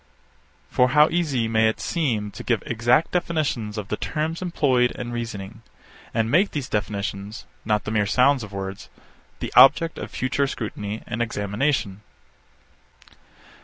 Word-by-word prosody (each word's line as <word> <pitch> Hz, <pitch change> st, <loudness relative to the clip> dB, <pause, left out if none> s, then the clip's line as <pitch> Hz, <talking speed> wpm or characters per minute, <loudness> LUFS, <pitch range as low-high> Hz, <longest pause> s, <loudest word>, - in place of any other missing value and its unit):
For 125 Hz, 0 st, +3 dB
how 150 Hz, +3 st, +5 dB
easy 150 Hz, -9 st, 0 dB
may 110 Hz, 0 st, +3 dB
it 110 Hz, -, -4 dB
seem 115 Hz, -11 st, -1 dB
to -, -, -9 dB
give 115 Hz, -4 st, 0 dB
exact 120 Hz, +7 st, +2 dB
definitions 155 Hz, -, -1 dB
of 105 Hz, -1 st, -5 dB
the 105 Hz, -, -2 dB
terms 160 Hz, +2 st, -3 dB
employed 135 Hz, -9 st, +2 dB
in 120 Hz, -1 st, -6 dB
reasoning, 115 Hz, -2 st, -6 dB, 0.5 s
and 115 Hz, 0 st, 0 dB
make 185 Hz, +7 st, +4 dB
these 145 Hz, -4 st, -4 dB
definitions, 100 Hz, 0 st, -4 dB, 0.2 s
not 105 Hz, -1 st, +1 dB
the -, -, -4 dB
mere 105 Hz, -2 st, +1 dB
sound 130 Hz, +5 st, +3 dB
of 105 Hz, -2 st, -8 dB
words, 95 Hz, 0 st, -6 dB, 0.5 s
the -, -, -4 dB
object 160 Hz, +5 st, +6 dB
of -, -, -6 dB
future 140 Hz, +2 st, -1 dB
scrutiny 105 Hz, -3 st, -5 dB
and 115 Hz, 0 st, -3 dB
examination? 105 Hz, -1 st, -1 dB
115 Hz, 145 wpm, -23 LUFS, 105-140 Hz, 0.5 s, object